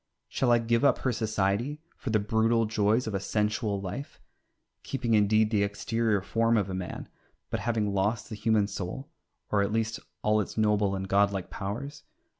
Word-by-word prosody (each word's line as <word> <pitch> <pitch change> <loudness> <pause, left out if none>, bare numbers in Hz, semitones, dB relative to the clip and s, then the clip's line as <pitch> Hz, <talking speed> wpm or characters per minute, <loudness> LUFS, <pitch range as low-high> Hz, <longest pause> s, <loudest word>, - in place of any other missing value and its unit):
Shall 125 -2 +1
I 120 - +6
give 115 +2 +1
up 140 - +5
her 130 - 0
society 110 +5 -1 0.2
for - - -6
the 110 - +3
brutal 110 +2 +2
joys 110 +2 +1
of 110 - -4
a 95 - 0
sensual 105 +1 -1
life, 100 +10 -6 0.6
keeping 120 -4 -2
indeed 110 +1 +4
the 105 -3 +2
exterior 105 0 0
form 115 +2 +2
of 100 -3 0
a - - -3
man, 95 -1 -5 0.4
but - - -1
having 110 -3 0
lost 105 +3 0
the 110 - -6
human 105 -1 +2
soul, 100 - -6 0.4
or 105 - +3
at 100 +1 0
least 110 +1 -1 0.2
all 105 0 +3
its 105 - -6
noble 105 -2 +2
and 95 0 -4
godlike 100 -1 +1
powers? 130 +10 -5
110 Hz, 180 wpm, -28 LUFS, 100-115 Hz, 0.6 s, I